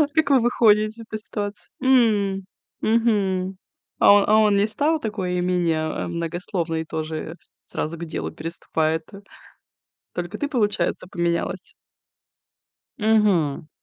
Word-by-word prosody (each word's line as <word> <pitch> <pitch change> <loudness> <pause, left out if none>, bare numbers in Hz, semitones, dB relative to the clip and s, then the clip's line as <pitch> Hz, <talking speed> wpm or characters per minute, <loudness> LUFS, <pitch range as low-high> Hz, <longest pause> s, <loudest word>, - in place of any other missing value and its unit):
Как 315 -2 +3
вы 270 -2 +6
выходите 215 -3 +4
из - - -10
этой 215 -1 -6
ситуации? 205 -1 -6
М. 210 -7 +3 0.4
Мгм. 195 -5 +1 0.4
А, - - +5
а - - +10
о - - -1
а 215 +1 +5
он 210 -2 +4
не 205 +2 +3
стал 300 +8 0
такой 190 -6 -2
менее, 175 -3 +1 0.3
э, - - -5
многословный? 170 -1 -3
Тоже 160 +1 -5 0.3
сразу 165 +2 -4
к 170 - -5
делу 160 - -4
переступает. 160 0 -2 1.1
Только 175 0 -5
ты, 290 - -1
получается, 210 -8 0
поменялась? 170 -1 -2 1.2
Мгм. 205 - +2
195 Hz, 125 wpm, -23 LUFS, 170-220 Hz, 1.2 s, а